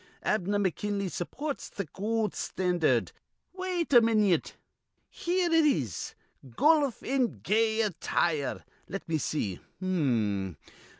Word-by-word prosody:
Abner 205 -1 +1
McKinley 200 0 -1
supports 280 - -4
th' 195 -7 -6
goold 215 +2 -1
standard. 180 -3 0 0.4
Wait 365 -4 -2
a 240 - +9
minyit. 215 -6 +2 0.6
Here 360 +1 0
it 325 -1 +5
is: 140 - 0 0.3
'Goluf 280 - +2
in 260 -2 0
gay 220 +1 +2
attire.' 165 -6 -1 0.2
Let 195 +3 -6
me 160 -1 0
see. 110 -10 -2 0.2
H'm. 115 - 0
200 Hz, 110 wpm, -29 LUFS, 160-245 Hz, 0.6 s, a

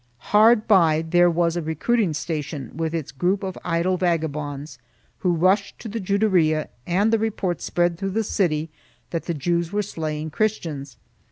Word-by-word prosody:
Hard 215 +1 +5
by 165 -6 +4
there 175 +1 +5
was 170 0 +1
a 175 - -1
recruiting 165 +5 0
station 150 -3 -4
with 160 0 -2
its 160 -4 -4
group 180 +9 0
of 190 -1 -4
idle 175 +1 0
vagabonds, 150 -4 -2 0.4
who 180 - +1
rushed 190 +4 +2
to 235 - -8
the 225 +2 -4
Juderia 185 -6 +2 0.2
and 200 +6 +2
the 225 - +4
report 200 -5 -2
spread 175 -1 0
through 195 - -2
the 225 - +2
city 165 -7 0 0.4
that 165 - -3
the 170 - -2
Jews 170 +3 -1
were 210 0 0
slaying 155 -4 -4
Christians. 150 - -2
175 Hz, 165 wpm, -23 LUFS, 155-195 Hz, 0.4 s, Hard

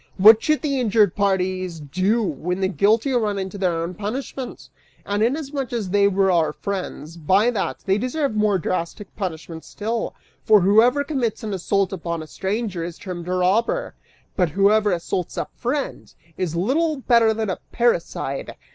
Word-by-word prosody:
What 215 +3 +8
should 305 0 +1
the 280 -3 0
injured 215 -5 +3
parties 185 -3 0
do 185 +10 0
when 180 +1 -2
the 190 - +1
guilty 215 +7 +2
run 215 -5 0
into 190 +1 -5
their 170 -3 0
own 170 +2 -4
punishment? 250 +6 -5 0.4
And 205 +1 -1
inasmuch 275 +2 -1
as 220 -6 -3
they 200 0 +4
were 195 -1 +2
our 160 -4 +2
friends, 180 -5 -5
by 190 +9 +3
that, 210 -5 -3
they 195 +1 +2
deserve 260 +1 -1
more 210 -2 +2
drastic 185 +3 -4
punishment 165 -4 -5
still, 225 +2 -4 0.3
for 215 -2 +5
whoever 225 +9 +4
commits 260 -8 -2
an 215 -2 -3
assault 195 +1 0
upon 170 -2 -4
a - - -9
stranger, 195 +1 -3
is 170 0 -6
termed 180 -5 -7
a 180 - -1
robber; 210 - +1 0.4
but 180 -3 +2
whoever 205 +5 +3
assaults 175 0 -3
a - - -1
friend, 270 +4 -3 0.2
is 170 -3 -2
little 295 - +1
better 235 -3 +4
than 220 -2 -1
a - - -4
parricide!" 170 - -1
200 Hz, 165 wpm, -22 LUFS, 180-230 Hz, 0.4 s, What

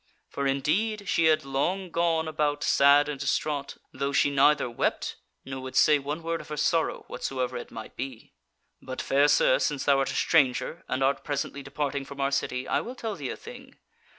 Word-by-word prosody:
For 140 0 -1
indeed 200 +10 0
she 165 - +2
had 155 -2 +3
long 175 +7 -1
gone 165 -1 +1
about 150 -2 -1
sad 140 +1 +5
and 145 -2 -4
distraught, 140 +1 -2 0.2
though 140 +1 -2
she 145 0 +3
neither 140 0 +4
wept, 120 - -2 0.3
nor 130 0 -6
would 130 0 -8
say 150 -1 +5
one 145 +4 -5
word 165 0 -2
of - - -14
her 150 -1 -5
sorrow, 160 +2 0
whatsoever 130 -2 -3
it - - -6
might 110 - -9
be. 130 -3 -7 0.5
"But, 130 0 -7
fair 140 +2 +3
sir, - - +4
since 145 -3 -1
thou 140 -1 +4
art 135 - 0
a - - -4
stranger, 145 +1 +2
and 130 +1 -1
art 135 +1 +1
presently 145 -1 -3
departing 140 0 -3
from 140 0 -10
our 140 0 +1
city, 130 -1 -2
I 140 - +1
will 245 +9 -7
tell 225 -3 -4
thee - - -5
a - - -5
thing. 475 +2 -12
145 Hz, 200 wpm, -27 LUFS, 135-160 Hz, 0.5 s, sad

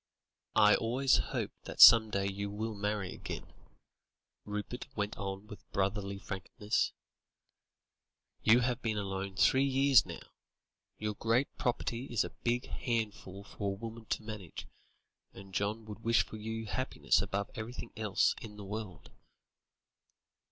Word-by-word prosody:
"I 105 -1 +7
always 130 +4 +3
hope - - -2
that - - -8
some 110 -2 +10
day 100 -1 -1
you 100 +1 -3
will 110 +2 -3
marry 105 -2 -2
again," - - -7 0.9
Rupert 105 +5 -5
went 105 0 -1
on 95 +1 -5
with 105 -1 -13
brotherly 100 0 -1
frankness; 105 +2 -2 1.5
"you 115 +3 +6
have 125 +1 0
been 110 -2 -1
alone 95 -1 -3
three 130 +7 +4
years 135 -2 +5
now. - - -9 0.7
Your 105 0 -2
great 115 +6 0
property 125 -2 -2
is 120 -5 0
a - - -6
big 120 +1 -1
handful 105 -5 -3
for 100 -1 -4
a - - -6
woman 115 +1 -8
to 110 - -2
manage, 105 -6 -7 0.7
and 95 0 -12
John 105 +3 -1
would 105 -1 -8
wish 115 0 +3
for 110 - -9
your 110 +1 -5
happiness 130 -6 +1
above 100 +1 -3
everything 115 +3 -6
else 110 -4 +2
in 105 -2 -9
the 100 - -8
world." 105 -3 -7
105 Hz, 140 wpm, -32 LUFS, 100-115 Hz, 1.5 s, some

